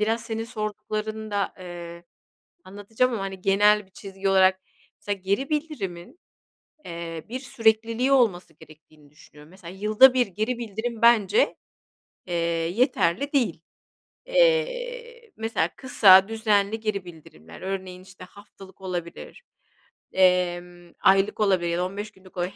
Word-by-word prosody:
biraz 225 +2 0
senin 225 0 -4
sorduklarını 215 0 -5
da, 200 -1 -2
eee, 175 -1 -9 0.6
anlatacağım 220 +6 -2
ama, 210 - -3
hani, 190 -1 -6
genel 205 +1 +3
bir 190 - -29
çizgi 195 0 -5
olarak 190 0 +4 0.4
mesela 205 -1 -4
geri 200 +9 -1
bildirimin, 285 - -5 0.7
eee, 170 -2 -7
bir 255 +2 -5
sürekliliği 230 0 +1
olması 185 - +2
gerektiğini 155 -1 -19
düşünüyorum. 150 +1 -18
Mesela, 185 -1 -12
yılda 215 +6 +5
1 250 -1 +2
geri 215 +6 -3
bildirim 230 +1 -5
bence, 235 - +4 0.7
eee, 175 - -4 0.4
yeterli 240 - +1
değil. 235 - 0 0.7
Eee, - - 0
mesela 220 -7 -1
kısa, 195 -7 +6
düzenli 220 -1 0
geri 205 -4 -3
bildirimler, 80 - -14
örneğin, 185 -1 -6
işte, 185 -1 -14
haftalık 195 -1 -16
olabilir, 175 - -7 0.7
emm, 175 -1 +1
aylık 195 +3 +3
olabilir 185 -5 +2
ya 170 - -1
da 180 - 0
15 205 +3 -6
günlük 190 -2 -19
olabilir. 180 +2 -3
200 Hz, 130 wpm, -24 LUFS, 180-230 Hz, 0.7 s, kısa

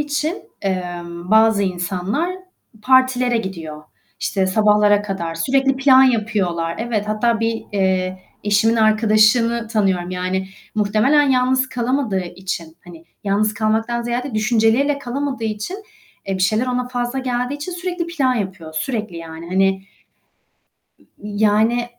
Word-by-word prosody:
için, 295 +4 -2 0.2
emm, 175 -1 -4
bazı 220 -1 +5
insanlar 185 - -2 0.5
partilere 255 -1 +3
gidiyor, 165 -7 -6 0.4
işte 190 -2 0
sabahlara 210 +1 +3
kadar, 190 -5 -4
sürekli 270 +10 +1
plan 265 -1 +6
yapıyorlar, 205 -9 0
evet, 220 -3 -2
hatta 225 +2 +1
bir, 225 0 -1
eee, 185 -1 0 0.3
eşimin 210 +3 +3
arkadaşını 220 +2 +3
tanıyorum 190 -5 0
yani 185 +1 -2 0.3
muhtemelen 215 +8 +3
yalnız 260 0 +2
kalamadığı 240 -6 -1
için, 175 -2 -6
hani 170 -2 -13 0.2
yalnız 210 +2 +1
kalmaktan 225 +2 0
ziyade 240 +2 -3
düşünceleriyle 225 +6 +2
kalamadığı 270 -2 -3
için, 215 - -3 0.5
eee, 195 - -1
bir 185 - -2
şeyler 215 +6 +2
ona 250 0 -1
fazla 245 +1 -2
geldiği 250 0 -2
için 295 +5 -6
sürekli 350 -1 -3
plan 280 -7 0
yapıyor, 190 -7 -5
sürekli 215 -1 -3
yani 165 0 -9
hani 190 +1 +1 1.2
ı - - -24 0.2
yani 215 +3 +2
215 Hz, 125 wpm, -20 LUFS, 190-250 Hz, 1.2 s, plan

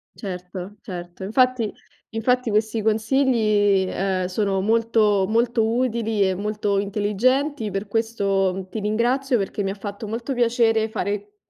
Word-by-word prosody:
Certo, 185 0 -7
certo. 175 -3 -8
Infatti, 240 +1 +2 0.4
infatti, 250 +2 0
questi 220 +1 0
consigli, 215 -3 +2
ehm, 185 -1 -1
sono 195 +1 0
molto 215 -1 +2
molto 230 +1 +2
utili 225 -3 +1
e 190 - 0
molto 205 0 -1
intelligenti. 220 +6 0
Per 195 +2 -3
questo 195 -4 0
ti 220 - -4
ringrazio 240 +5 +1
perché 200 0 -2
mi 195 - -1
ha 195 - -4
fatto 205 +1 -7
molto 230 +5 -3
piacere 230 -2 +2
fare 205 -1 -3
215 Hz, 130 wpm, -23 LUFS, 195-230 Hz, 0.4 s, Infatti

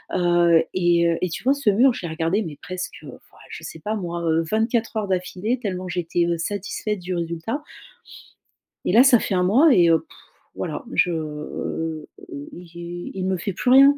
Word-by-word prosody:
heu, 175 -2 +4
et 175 -2 +3
heu 165 - 0
et 185 - +1
tu 160 - -6
vois, 270 - +4
ce 280 -6 +1
mur, 245 +5 +4
je - - -7
l'ai - - -3
regardé 165 +6 0
mais 160 -8 -6
presque, 185 0 -5
heu, - - -10
enfin - - -9
ouais, - - -20
je - - -8
sais - - -8
pas 215 +1 -3
moi, 175 -4 -4
heu, 165 +1 +2
24 225 +1 0
heures 215 -2 -1
d'affilée 190 +6 -1
tellement 185 -4 -4
j'étais, 175 -1 0
heu, 170 0 0
satisfaite 205 +3 -3
du 180 +1 -4
résultat. 170 - -3 1.2
Et - - +1
là, 230 +6 +7
ça 260 -3 +6
fait 205 - -2
1 180 - +2
mois 260 - +5
et, 175 -2 +5
heu, 165 -1 +5
pfff, - - -20 0.4
voilà, - - -4
je 175 - +3 1.4
il 175 0 -8
il 190 -1 -3
me 190 -1 0
fait 195 +3 -3
plus 245 +7 0
rien! 275 +2 +8
185 Hz, 200 wpm, -23 LUFS, 170-220 Hz, 1.4 s, rien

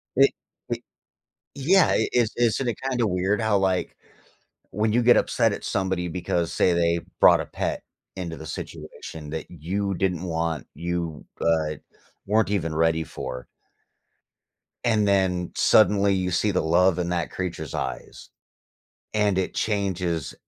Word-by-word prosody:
It 135 +1 +6 0.4
it - - -2 0.7
Yeah, 165 +7 +4
it - - +1
is 120 -3 +2
isn't 120 +2 +1
it 120 - -1
kinda 120 -3 +1
weird 95 +3 0
how, 110 -2 +2
like, 95 -2 0 0.7
when 105 +2 0
you 120 - +3
get 120 +1 +6
upset 115 -3 +2
at - - -6
somebody 95 -2 -1
because, 85 -1 -2
say, 90 - +3
they 85 0 +2 0.2
brought - - +7
a - - -4
pet - - -3 0.3
into 85 -3 -5
the 80 - -9
situation 75 -1 -8
that 80 0 -5
you 95 +5 -2
didn't 90 -2 -1
want, 80 -4 -2
you, 85 -3 -4 0.2
uh, 80 -2 +1 0.5
weren't 110 +1 +2
even 80 -6 -1
ready 80 0 +2
for 65 -4 -7 1.4
and 110 -3 +2
then 95 -3 +1
suddenly 100 -1 +4
you 95 -1 -1
see 105 +4 +1
the 90 - +1
love 90 +2 +3
in 85 0 -1
that 85 -2 -1
creature's 85 -5 -4
eyes, - - -5 0.8
and 105 -3 +2
it 95 - -1
changes 90 -6 -1
90 Hz, 145 wpm, -25 LUFS, 85-105 Hz, 1.4 s, brought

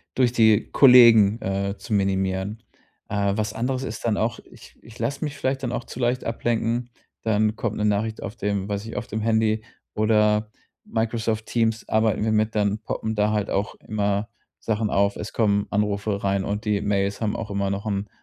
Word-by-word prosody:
durch 125 -2 +2
die 110 -3 +4
Kollegen, 115 -5 +7
äh, 100 +1 -2
zu 110 - -6
minimieren. 95 +1 0 0.5
Äh, 100 -1 0
was 105 0 -1
anderes 125 +3 -2
ist 115 -3 -6
dann 110 -3 +1
auch, 115 +1 -1
ich - - -16
ich 115 +1 -15
lasse 140 +7 -2
mich 150 -2 -4
vielleicht 135 -1 -2
dann 120 - -2
auch 120 -1 -3
zu 125 - -9
leicht 125 +1 0
ablenken. 115 +1 -1 0.3
Dann 110 0 +1
kommt 110 -2 -3
'ne 105 - 0
Nachricht 105 +1 0
auf 115 0 -6
dem, 100 -2 -2
weiß 100 +1 -3
nicht, 115 - -7
auf - - -4
dem 110 +1 -3
Handy 110 0 +1 0.3
oder 105 0 +2 0.3
Microsoft 110 -1 -2
Teams 115 -1 0
arbeiten 110 -1 +1
wir 110 - +1
mit, 110 +1 +1
dann 105 0 +1
poppen 110 0 -4
da 105 0 +2
halt 105 -1 -1
auch 100 +2 -1
immer 105 0 -2 0.3
Sachen 110 -1 -1
auf. 100 0 +2
Es 105 - -6
kommen 100 -2 +1
Anrufe 100 -1 -1
rein 100 -1 +1
und 105 +2 -3
die 105 -1 +1
Mails 100 0 -1
haben 110 -2 0
auch 110 -2 -5
immer 100 -1 -1
noch 100 +2 -3
'n 100 0 -2
110 Hz, 195 wpm, -24 LUFS, 100-115 Hz, 0.5 s, Kollegen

